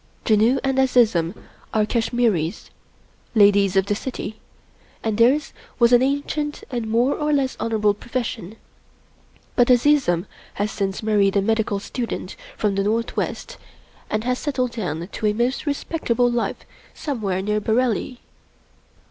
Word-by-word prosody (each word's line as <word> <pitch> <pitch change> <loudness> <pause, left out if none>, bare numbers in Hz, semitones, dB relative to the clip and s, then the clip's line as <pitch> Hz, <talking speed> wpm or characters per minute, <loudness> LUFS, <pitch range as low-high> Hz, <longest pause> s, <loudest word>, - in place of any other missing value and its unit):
Janoo 225 +4 +4
and 270 -1 +1
Azizun 225 -9 +3 0.4
are 215 -1 +3
Kash 225 +1 -1
miris, 215 -7 0 0.6
Ladies 200 -2 +5
of 190 -1 +3
the 205 - 0
City, 220 -1 -5 0.6
and 220 -2 0
theirs 265 +6 +3 0.2
was 235 0 +4
an 245 - +7
ancient 285 +2 -1
and 240 -3 -2
more 235 +5 +2
or 300 0 -1
less 275 -3 +1
honorable 215 -2 +1
profession; 225 -3 -5 1.0
but 245 -2 +4
Azizun 245 - +3 0.3
has 205 +1 -1
since 195 0 -3
married 205 -2 +2
a - - +4
medical 220 -1 +1
student 235 +4 -5 0.2
from 210 -2 +1
the 195 0 0
Northwest 230 - -2 0.5
and 215 0 -1
has 250 +1 -1
settled 255 -4 -1
down 175 -7 -4
to 215 - -3
a 210 - +2
most 245 +6 -1
respectable 250 -4 0
life 240 -1 -2 0.3
somewhere 205 -10 -2
near 210 +1 0
Bareilly. 240 +2 0
225 Hz, 140 wpm, -22 LUFS, 205-255 Hz, 1.0 s, an